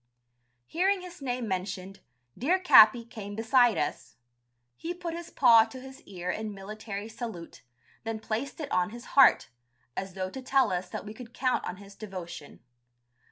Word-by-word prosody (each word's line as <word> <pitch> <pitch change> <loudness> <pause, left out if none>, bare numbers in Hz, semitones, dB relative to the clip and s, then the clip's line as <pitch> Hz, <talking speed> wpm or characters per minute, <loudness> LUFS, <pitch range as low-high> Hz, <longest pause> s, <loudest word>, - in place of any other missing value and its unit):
Hearing 380 - +1
his 355 -3 -11
name 250 -3 -3
mentioned, 190 0 -4 0.4
dear 335 +10 +2
Capi 235 - +7
came 205 -3 -8
beside 230 +1 +3
us: 145 - -3 0.6
he 345 - -5
put 350 -2 -5
his 340 0 -7
paw 230 -4 +6
to 225 +3 -10
his 265 +1 -12
ear 180 -2 -4
in 215 -1 -5
military 205 +1 -7
salute, 220 -7 -8 0.4
then 225 -1 -4
placed 225 +7 -4
it 290 -3 -5
on 220 0 +1
his 235 +2 -10
heart, 270 -2 +6 0.5
as 190 -1 -5
though 185 -1 -3
to 265 - -7
tell 265 -2 +2
us 180 0 -2
that - - -6
we 210 - -7
could 240 +1 -12
count 255 -1 0
on 180 - -5
his 200 0 -13
devotion. 185 -8 -9
225 Hz, 165 wpm, -28 LUFS, 200-265 Hz, 0.6 s, Capi